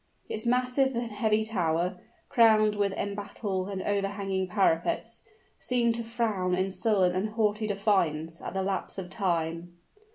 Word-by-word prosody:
Its 220 +2 -3
massive 250 +2 +2
and 235 -1 -2
heavy 215 +1 +1
tower, 180 -3 -1 0.3
crowned 220 -4 +5
with 200 -1 +1
embattled 200 -1 -3
and 195 -2 -4
overhanging 195 -2 -1
parapets, 195 +4 +1 0.4
seemed 240 -2 +1
to 235 0 -4
frown 220 -6 0
in 190 +1 0
sullen 195 -3 +2
and 185 +4 -1
haughty 215 -1 +1
defiance 170 -6 0
at - - -6
the 190 - 0
lapse 195 0 -2
of 185 -1 -6
Time. 175 -3 -2
200 Hz, 140 wpm, -28 LUFS, 185-220 Hz, 0.4 s, crowned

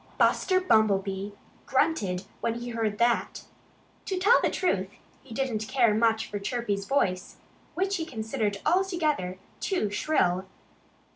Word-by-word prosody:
Buster 370 -1 +3
Bumblebee 200 - +2 0.4
grunted 195 - +1 0.2
when 230 - -1
he 240 +1 -5
heard 225 -3 -1
that. 235 +1 +1 0.6
To 380 - -2
tell 410 +7 +5
the - - +2
truth, 195 - 0 0.3
he 265 - -18
didn't 225 -3 -2
care 235 -2 +3
much 220 0 +2
for 205 - -4
Chirpy's 200 -2 -2
voice, 190 -9 0 0.4
which 390 +1 0
he 325 - -3
considered 220 -3 -2
altogether 320 - +1 0.2
too 290 - -1
shrill. 190 - +1
225 Hz, 130 wpm, -27 LUFS, 200-305 Hz, 0.6 s, tell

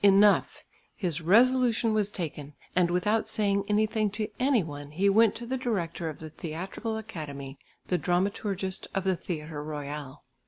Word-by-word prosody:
Enough; 200 +1 +5 0.3
his 175 -5 -1
resolution 230 +4 +4
was 210 -2 +2
taken; 150 -6 -5 0.2
and 180 -1 +4
without 210 +6 +1
saying 200 -2 +1
anything 215 0 +2
to 210 +1 -3
any 255 -5 +3
one, 145 -2 -7
he 185 +7 +1
went 220 +2 +5
to 235 - -5
the 260 +2 -2
director 175 -9 -2
of 155 - -7
the 155 -1 -9
Theatrical 185 +9 -4
Academy 145 -10 -7 0.3
the 180 - +1
dramaturgist 190 +1 -1
of 195 - 0
the 190 -1 +2
Theatre 155 -4 -5
Royal. 145 -2 -6
190 Hz, 155 wpm, -28 LUFS, 155-215 Hz, 0.3 s, Enough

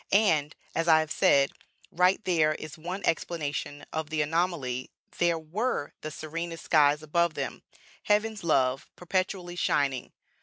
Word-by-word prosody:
And, 165 -8 +3 0.2
as 165 +1 -1
I 160 -1 +7
have 155 -1 -5
said, 140 -1 +4 0.4
right 180 +2 +3
there 155 -4 +3
is 155 +1 -8
one 180 +4 -6
explanation 150 -3 -2
of 160 -1 -3
the 155 -1 +1
anomaly; 150 -6 -1 0.3
there 170 -1 +3
were 165 - -2
the 155 - -4
serenest 165 +2 -6
skies 150 -1 +4
above 170 +1 +1
them - - -4 0.4
heaven's 210 0 +1
love 135 -5 +1
perpetually 180 0 -2
shining. 140 -7 0
160 Hz, 140 wpm, -28 LUFS, 150-175 Hz, 0.4 s, I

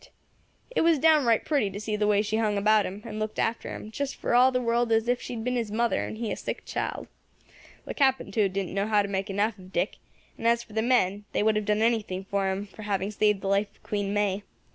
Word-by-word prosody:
It - - +1
was 330 -1 +4
downright 285 -7 +4
pretty 280 -10 +1
to 195 +1 -7
see 215 0 -2
the 210 0 +1
way 205 0 +3
she 215 +1 -1
hung 215 -2 +1
about 215 +1 +3
him, 200 +3 -8
and 215 - -6
looked 215 0 -3
after 225 +1 -1
him, 215 - -7
just 280 +4 -3
for - - -2
all 250 +2 +6
the 250 - +1
world 235 -1 +1
as 225 +1 +2
if 245 0 +1
she 245 - -6
had 225 - -5
been 250 +1 -1
his 230 -3 -1
mother, 235 +2 +1
and - - -7
he 225 -2 -3
a - - -1
sick - - -5
child. - - -3 0.8
The - - -5
Captain, 265 -7 +1
too, 200 -1 +2
didn't 190 -1 -3
know 200 +1 0
how 210 -2 +3
to - - -3
make 195 +1 -2
enough 205 +2 0
of 185 0 -13
Dick; 180 +2 -1 0.4
and 230 - 0
as 235 0 +3
for 215 - -17
the 220 - +1
men, 210 -4 +1
they - - +1
would 220 0 +3
have 210 -1 -1
done 210 +1 +1
anything 215 -5 0
for 195 0 -1
him 190 +2 -2
for 210 +2 -13
having 200 -1 -2
saved 210 -1 +2
the 195 - -4
life 200 +1 +2
of - - -30
Queen 205 -2 -2
May. 205 -1 0
215 Hz, 260 wpm, -27 LUFS, 200-235 Hz, 0.8 s, all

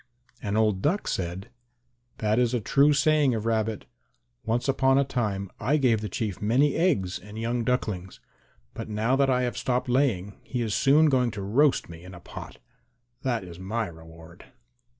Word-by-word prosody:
And 100 +1 -2
old 105 -4 +2
Duck 180 - 0
said, 90 +2 -3 0.7
"That 110 +1 +1
is 125 0 +2
a - - +1
true 140 +7 +3
saying 145 -2 +3
of 110 0 -4
Rabbit. 110 -2 -1 0.6
Once 115 +4 -1
upon 135 0 +3
a 140 - +4
time 105 -8 -2
I 150 +4 +2
gave 120 -6 +2
the 105 - -4
Chief 100 0 -4
many 130 +7 +3
eggs 110 - +1
and 105 +3 -11
young 115 +1 -1
ducklings, 105 -7 -2 0.5
but - - -7
now 110 +4 +1
that 135 0 +2
I 125 -1 +2
have 125 - -2
stopped 125 -1 -1
laying 115 -7 0
he 125 -2 -3
is 110 -2 -2
soon 150 +4 +4
going 130 -5 +3
to 105 -3 -6
roast 135 +8 +2
me 85 0 -11
in 90 0 -11
a - - -10
pot. - - -10 0.6
That 120 -5 -1
is 85 -1 -10
my 110 +5 -2
reward." 80 -1 -13
115 Hz, 180 wpm, -26 LUFS, 100-130 Hz, 0.7 s, a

